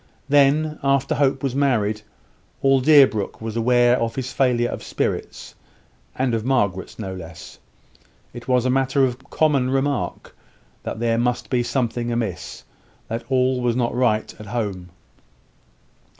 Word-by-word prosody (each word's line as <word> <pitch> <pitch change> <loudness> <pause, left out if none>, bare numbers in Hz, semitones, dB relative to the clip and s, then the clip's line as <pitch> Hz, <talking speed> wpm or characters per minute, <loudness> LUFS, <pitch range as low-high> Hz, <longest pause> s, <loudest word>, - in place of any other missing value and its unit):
Then, 145 +2 +3
after 140 0 +1
Hope 135 -1 +1
was 135 -3 -1
married, 115 -7 +1 0.6
all 135 -1 +4
Deerbrook 135 -8 +4
was 110 0 -5
aware 120 +1 +3
of 115 0 -2
his 130 -1 -4
failure 120 -3 +2
of - - -6
spirits; - - -4 0.6
and 130 -2 0
of 110 -1 -1
Margaret's 105 -8 -1
no 95 -4 -5
less. 85 -3 -10 0.7
It 120 0 -10
was 125 -1 +2
a 130 - +2
matter 135 +1 +2
of 130 +2 -5
common 140 -5 +2
remark, 135 0 -2 0.5
that - - -5
there 115 -1 +1
must 125 +1 -1
be 125 -2 +2
something 120 -1 -2
amiss 115 -6 -4 0.5
that 115 +1 -4
all 130 -1 +1
was 120 -1 +1
not 120 -1 0
right 120 -3 0
at 105 - -10
home. 100 -6 -4
125 Hz, 145 wpm, -22 LUFS, 115-135 Hz, 0.7 s, all